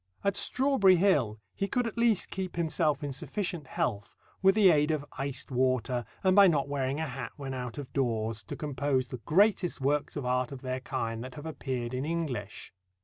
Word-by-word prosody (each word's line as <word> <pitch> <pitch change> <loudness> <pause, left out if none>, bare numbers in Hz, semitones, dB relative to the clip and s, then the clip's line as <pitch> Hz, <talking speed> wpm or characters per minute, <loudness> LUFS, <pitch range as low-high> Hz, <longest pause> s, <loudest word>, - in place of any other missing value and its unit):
At 200 -1 +1
Strawberry 255 -8 +4
Hill 145 - +2
he 195 - -2
could 245 +3 0
at 230 - -4
least 230 -4 +2
keep 190 -2 -4
himself 160 -3 +1
in 145 - -3
sufficient 165 +2 -4
health 100 -5 -2 0.3
with 195 +1 +5
the 200 -4 +7
aid 150 -1 +3
of 155 -2 -1
iced 140 0 -3
water 125 -1 +1 0.2
and 185 -1 +4
by 200 -1 +8
not 145 -6 +2
wearing 140 0 -1
a 160 - -1
hat 135 -2 -6
when 135 -2 -5
out 125 -2 -5
of 145 -3 -7
doors 115 -5 -1
to - - -6
compose 140 -2 -1
the 125 - -5
greatest 190 0 +3
works 145 +2 0
of 145 -4 -3
art 125 0 0
of 135 -1 -8
their 130 0 -2
kind 115 -3 -3
that 130 0 -9
have 145 - -8
appeared 130 -6 -4
in 130 +1 -2
English. 145 -10 -4
145 Hz, 200 wpm, -29 LUFS, 130-175 Hz, 0.3 s, by